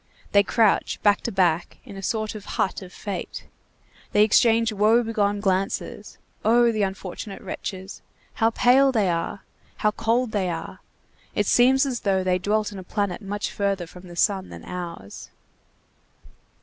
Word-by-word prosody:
They 200 - +6
crouch, 215 +1 +2
back 205 -1 +4
to 235 - -3
back, 175 -4 +1
in - - -10
a 195 - -7
sort 215 +2 -2
of 215 -2 -8
hut 190 - 0
of 185 -1 -10
fate. 200 0 -6 0.7
They 210 - +6
exchange 225 +1 +4
woe 215 +4 +4
begone 205 -3 0
glances. 195 -1 -2 0.3
Oh, 235 +1 +4
the 215 -2 -1
unfortunate 195 +1 -4
wretches! 190 0 -7 0.3
How 225 - +2
pale 260 +4 +4
they 215 -7 +1
are! 170 +3 -3 0.4
How 210 - +2
cold 230 +2 0
they 195 -4 0
are! 165 -1 -6 0.6
It 205 - +1
seems 260 +6 +4
as 255 -3 -2
though 190 -2 +1
they 185 0 +1
dwelt 210 +3 0
in 200 - -8
a - - -8
planet 200 +1 -2
much 205 0 -4
further 195 -3 -1
from 180 +2 -13
the 175 - -10
sun 190 +1 +1
than - - -10
ours. 170 - -7
205 Hz, 160 wpm, -24 LUFS, 190-225 Hz, 0.7 s, They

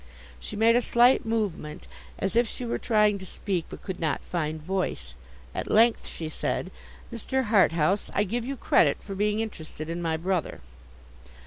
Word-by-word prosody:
She - - -7
made 225 +2 +4
a 245 - +4
slight 240 0 +4
movement, 200 -9 -2 0.3
as 195 +3 -1
if 235 0 +4
she 245 - -5
were 235 - -2
trying 210 -3 +3
to 190 - -8
speak, 185 -4 -3
but - - -10
could 190 -3 -5
not 160 -3 -1
find 155 -2 -2
voice; 170 - -3 0.4
at - - -4
length 230 +2 +4
she 160 - -5
said, 180 +4 -2 0.4
'Mr. 260 +3 -1
Harthouse, 190 -2 +3
I 205 - +3
give 230 +4 -2
you 270 +3 -4
credit 145 -10 +3
for 200 - -8
being 210 +2 0
interested 160 -7 -6
in 170 +1 -3
my 165 -1 0
brother. 180 0 -2
195 Hz, 175 wpm, -27 LUFS, 165-225 Hz, 0.4 s, made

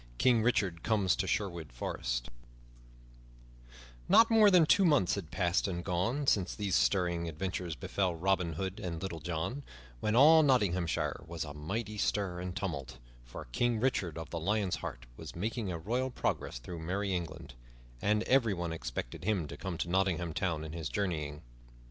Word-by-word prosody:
King 120 - +4
Richard 100 -8 +1
Comes 100 -6 +2
to 95 - -2
Sherwood 85 - -2
Forest - - -3 1.8
NOT 230 0 +7
MORE 220 -2 +7
than 180 -4 +6
two 195 - +5
months 145 - +4
had 95 -6 -4
passed 90 0 +1
and 85 -2 -4
gone 105 +11 0
since 100 -8 +2
these 100 -3 -1
stirring 85 +7 +1
adventures 90 0 -3
befell 90 +7 -1
Robin 90 -1 +1
Hood 95 +4 -4
and 85 -3 -4
Little 85 -3 -4
John, 85 - -3 0.4
when 105 - 0
all 155 +5 +8
Nottinghamshire 95 - +1
was 85 -1 -4
a 75 -2 -7
mighty 105 +8 -4
stir 95 -5 0
and 90 0 -5
tumult, 75 -11 -4 0.3
for - - -9
King 120 - +1
Richard 100 - 0
of 80 - -7
the 85 - -3
Lion's 100 +2 0
Heart - - -7
was - - -9
making 105 +2 -2
a 85 - -3
royal 120 +10 -1
progress 120 - -2
through 80 +8 -7
merry 95 +4 -2
England, 85 -6 -5 0.5
and 105 +1 +2
everyone 100 -11 +2
expected 80 -3 -5
him 95 -6 0
to 70 - -6
come 90 +2 -5
to - - -2
Nottingham 90 -2 0
Town 85 -4 -1
in 80 -1 -7
his 80 -2 -4
journeying. 75 -7 -2
90 Hz, 165 wpm, -32 LUFS, 80-105 Hz, 1.8 s, all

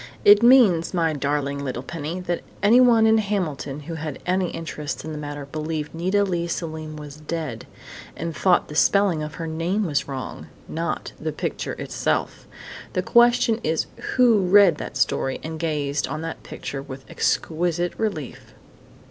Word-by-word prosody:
"It 205 +1 +8
means, 225 -10 +5
my 165 -2 +2
darling 140 0 -1
little 130 -2 -4
Penny, 165 +4 -5
that 175 -1 -2 0.2
_anyone 235 +1 +6
in 220 0 +5
Hamilton 160 -9 -2
who 165 +3 -7
had 155 -3 -5
any 185 0 +1
interest 155 -2 -5
in 160 - -5
the 155 - -5
matter 145 -1 -6
believed 155 +1 -4
Nita 185 +5 +1
Leigh 175 -3 -1
Selim 160 -2 -5
was 150 -1 -9
dead, 150 -7 -5 0.5
and 165 -1 -4
thought 185 -2 +3
the - - -9
spelling 190 0 +3
of 155 +1 -5
her 165 - -5
name 165 +6 -1
was 145 -5 -1
wrong, 130 -4 -6 0.2
not 165 +1 -3
the - - -3
picture - - -4
itself_!... - - -2 0.5
The - - 0
question 240 -1 +4
is 160 +1 0 0.3
who 245 -4 +5
read 190 -3 +5
that - - -6
story 135 - 0
and 160 0 -5
gazed 150 -3 -1
on 155 +3 -4
that 165 0 -5
picture 135 - -6
with 135 -1 -9
exquisite 175 +1 0
relief?" 195 - -4
165 Hz, 160 wpm, -23 LUFS, 150-190 Hz, 0.5 s, It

